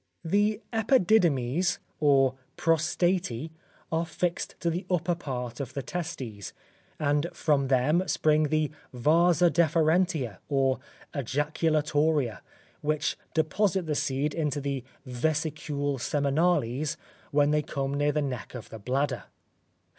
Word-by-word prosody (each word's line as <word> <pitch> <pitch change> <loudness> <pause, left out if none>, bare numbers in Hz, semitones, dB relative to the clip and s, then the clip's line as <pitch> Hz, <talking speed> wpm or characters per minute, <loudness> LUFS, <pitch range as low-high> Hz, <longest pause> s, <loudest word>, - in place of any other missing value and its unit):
The 205 +4 +2
epididemes, 180 - +3 0.2
or 135 -3 +4 0.2
prostatae 165 -3 +1 0.4
are 165 +1 +1
fixed 175 +2 -2
to 170 - +1
the 175 +4 -3
upper 180 -1 +1
part 125 -8 -5
of 135 0 -5
the 140 - -3
testes, 130 - -5 0.5
and 145 +1 +1
from 145 -4 +1
them 145 +8 +2
spring 155 0 +3
the 155 0 +1 0.2
vasa 170 +6 +4
deferentia, 160 - +2
or 135 -2 +2 0.3
ejaculatoria, 150 -1 +1 0.4
which 150 0 0 0.2
deposit 185 +4 +1
the 155 - -1
seed 140 +1 0
into 150 -3 -1
the 140 -2 -3 0.2
vesicule 145 +1 -1
seminales 145 -1 +1 0.3
when 145 0 +3
they 150 0 +3
come 140 -2 -3
near 145 +1 +2
the 150 0 0
neck 125 -4 -5
of 120 - -8
the 110 - -8
bladder. 125 - -1
150 Hz, 115 wpm, -28 LUFS, 135-165 Hz, 0.5 s, or